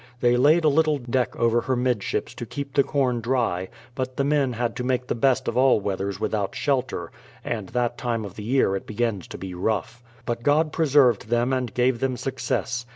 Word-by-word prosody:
They 120 0 +3
laid 150 +7 +4
a - - +4
little 155 0 +3
deck 125 -1 -1
over 115 0 +2
her 130 - -1
midships 125 -4 -1
to - - -6
keep 140 -1 -6
the 140 - +5
corn 130 -4 0
dry, 115 -7 0 0.2
but 130 0 -4
the 140 - +2
men 140 -3 +1
had 120 0 -2
to 125 - -3
make 125 0 0
the - - -1
best 130 +2 +1
of - - -1
all 130 -2 +4
weathers 100 -1 -3
with - - -2
out 100 -3 -1
shelter, 130 - -1 0.2
— - - -25
and 105 -6 -3
that 120 -1 -1
time 115 -3 -2
of 100 +1 -9
year 110 -2 +1
it 95 - -5
begins 110 -3 -2
to - - -8
be 95 0 -7
rough. 110 +5 -2 0.2
But 120 -1 -2
God 150 +4 +2
preserved 140 -9 +3
them 120 +3 +1
and 125 -3 -1
gave 125 -1 +1
them 130 -1 -1
success. 125 -2 -2
125 Hz, 215 wpm, -24 LUFS, 115-130 Hz, 0.2 s, the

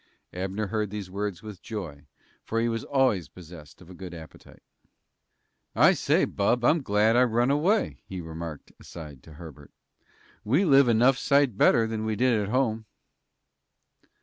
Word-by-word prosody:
Abner 95 +3 -3
heard 105 +1 -2
these 100 -2 -7
words 100 -1 -4
with 105 -5 -10
joy, 80 -10 -8 0.4
for 115 - -2
he 115 - +1
was 115 -1 -3
always 130 - 0
possessed 80 -2 -14
of 90 - -18
a - - -10
good 90 -1 -9
appetite. 80 -1 -14 1.1
"I - - +5
say, - - +1
bub, 120 +4 0
I'm 160 +5 +3
glad 110 -1 +2
I 125 - +5
run 120 +2 +1
away," 180 +10 0
he 95 - -7
remarked, 80 -2 -8
aside, 75 -6 -11
to 80 - -15
Herbert. 75 -3 -12 0.7
"We 140 - +2
live 140 -4 +5
enough 120 +3 +3
sight 140 -5 +2
better 115 +3 +4
than 110 -1 -4
we 110 0 -2
did 120 -1 +2
at 100 - -4
home." 115 -3 -1
105 Hz, 160 wpm, -26 LUFS, 90-120 Hz, 1.1 s, I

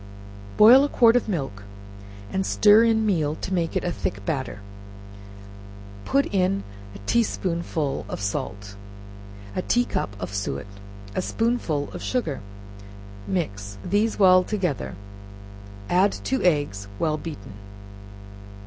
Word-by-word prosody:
Boil 240 +6 +8
a 290 - 0
quart 235 -3 +5
of 245 -2 +1
milk, 135 - -3 0.7
and 190 - 0
stir 210 +3 +5
in 220 -1 +2
meal 155 -7 +1
to 190 - -5
make 170 -3 -1
it - - 0
a 175 - -1
thick 100 -10 -4
batter; 130 -8 -3 1.5
put 275 +1 +2
in 195 +1 +1 0.3
a - - -9
tea 235 - +3
spoonful 170 -8 -2
of - - -5
salt, 100 0 -4 0.8
a - - 0
tea 245 +6 +1
cup 100 - -3
of 90 +1 -5
suet, 95 -9 -3 0.5
a - - -1
spoonful 205 -10 -1
of - - -7
sugar; 160 - -2 0.9
mix; 100 - -3
these 205 +4 +1
well 185 -2 +6
together, 180 - -2 0.9
add 190 +3 +3
two 265 - -2
eggs, 145 - +1
well 155 +2 0
beaten. 150 -12 -8
175 Hz, 130 wpm, -24 LUFS, 135-210 Hz, 1.5 s, Boil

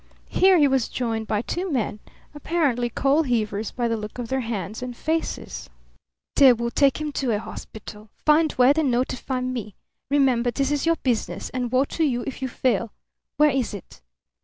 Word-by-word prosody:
Here 375 0 +5
he 295 -3 +5
was 265 -3 +1
joined 225 -3 -2
by 215 0 0
two 360 +5 -3
men, 220 -5 -1 0.3
apparently 290 -6 0
coal 275 +6 +2
heavers 220 -6 -1
by 240 -1 -2
the 230 - 0
look 210 +1 -7
of 240 -2 -5
their 265 - 0
hands 220 -4 -4
and 250 -1 -6
faces. 320 +1 -3 0.7
"They 270 -3 +8
will 235 0 -3
take 280 +3 +3
him 305 -1 -3
to 270 -3 -2
a - - 0
hospital. 215 0 -9 0.2
Find 310 +1 +4
where, 255 +2 +5
then 310 -2 +1
notify 255 +1 -1
me. 245 -5 -4 0.3
Remember, 260 -4 +3
this 275 +4 -1
is 290 +2 0
your 330 - +4
business, 245 -4 -1
and 250 -2 -3
woe 260 +2 +3
to 325 - -2
you 245 -5 0
if 275 - -6
you 260 - -1
fail. 240 -3 0 0.5
Where 300 0 +5
is 255 -5 -1
it?" 190 - -12
255 Hz, 185 wpm, -24 LUFS, 230-285 Hz, 0.7 s, They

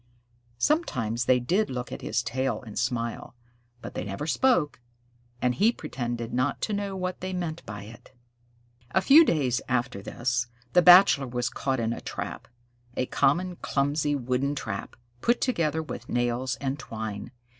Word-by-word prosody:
Sometimes 120 - 0
they 125 0 +4
did 180 - +1
look 125 -1 -4
at - - -6
his 120 +3 -1
tail 125 -1 -2
and 110 -4 -5
smile, 120 0 -2 0.5
but - - -7
they - - -3
never 100 +8 -4
spoke, 170 - +2 0.6
and 125 0 +3
he 210 - +4
pretended 120 - -4
not 130 +3 0
to 215 - -1
know 200 -1 -2
what 185 -1 -3
they 185 0 -3
meant 170 -3 -3
by 100 -1 -6
it. 110 +3 -13 0.8
A 190 - +5
few 290 - +8
days 135 - +1
after 120 -5 -1
this, 120 +3 -1 0.3
the 180 - +7
Bachelor 175 -6 +8
was 120 -1 -1
caught 135 -2 -1
in 115 0 0
a - - -7
trap - - -6 0.5
a 130 - +1
common, 175 +8 +1
clumsy, 145 +1 0
wooden 130 +2 -1
trap, 110 -7 -5 0.3
put 235 +1 +2
together 160 - 0
with - - -8
nails 120 +1 0
and 135 +1 -3
twine. 110 -4 -5
130 Hz, 160 wpm, -27 LUFS, 120-170 Hz, 0.8 s, few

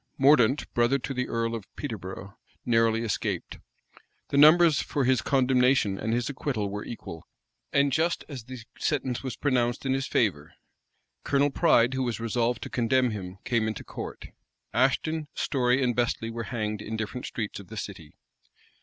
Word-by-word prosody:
Mordaunt, 135 -1 +4
brother 120 +3 +3
to 135 +1 -5
the 125 -1 -2
earl 115 0 -1
of 110 -4 -5
Peterborough, 100 -6 -6 0.3
narrowly 115 -1 +2
escaped. 110 -5 -3 0.7
The 140 - 0
numbers 155 0 +7
for 140 - -1
his 130 0 +3
condemnation 125 -6 +2
and 110 - -2
his 120 +1 0
acquittal 130 -7 -2
were 105 +1 -4
equal; 85 -8 -8 0.4
and 140 0 +3
just 165 +4 +1
as 130 -7 -8
the 130 +1 -8 0.2
sentence 130 -4 -1
was 130 -2 -5
pronounced 125 -3 0
in 135 - +1
his 135 0 -1
favor. 85 -8 0 0.7
Colonel 140 0 +2
Pride, 130 -6 +4
who 130 - -1
was 120 -3 -2
resolved 115 +1 -1
to - - -6
condemn 125 +1 +2
him, 95 -3 -6
came 115 -3 +1
into 110 -3 -4
court. - - -8 0.4
Ashton, 150 +5 +1
Storey, 125 0 +1
and 120 -2 +1
Bestley 115 -1 -1
were 115 0 -5
hanged 110 -4 -3
in 110 +1 -4
different 110 +3 -4
streets 105 -3 -4
of 100 - -12
the 110 - -9
city. 95 -7 -7
120 Hz, 165 wpm, -27 LUFS, 110-135 Hz, 0.7 s, numbers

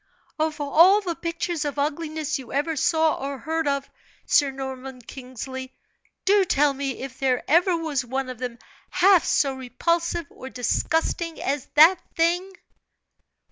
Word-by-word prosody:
"Of 310 0 -1
all 330 +8 +5
the 360 -4 -3
pictures 335 -1 -3
of 290 -1 -4
ugliness 305 0 -2
you 255 - -11
ever 295 +4 -1
saw 320 0 +1
or 275 0 -4
heard 320 +4 -2
of, 280 -1 -1 0.4
Sir 285 -2 +3
Norman 265 -1 -7
Kingsley, 260 +1 -8 0.5
do 400 0 +5
tell 295 -5 +2
me 270 -2 -4
if 265 -1 -8
there 260 -2 +1
ever 345 +3 +3
was 310 -5 -2
one 260 +2 -3
of 255 -2 -7
them 245 -2 -5 0.3
half 375 -2 +5
so 275 -2 +1
repulsive 335 +7 -1
or 260 - -10
disgusting 320 +7 -1
as 280 0 -2
that 325 +5 +7 0.2
thing?" 350 +3 +1
290 Hz, 145 wpm, -24 LUFS, 265-330 Hz, 0.5 s, that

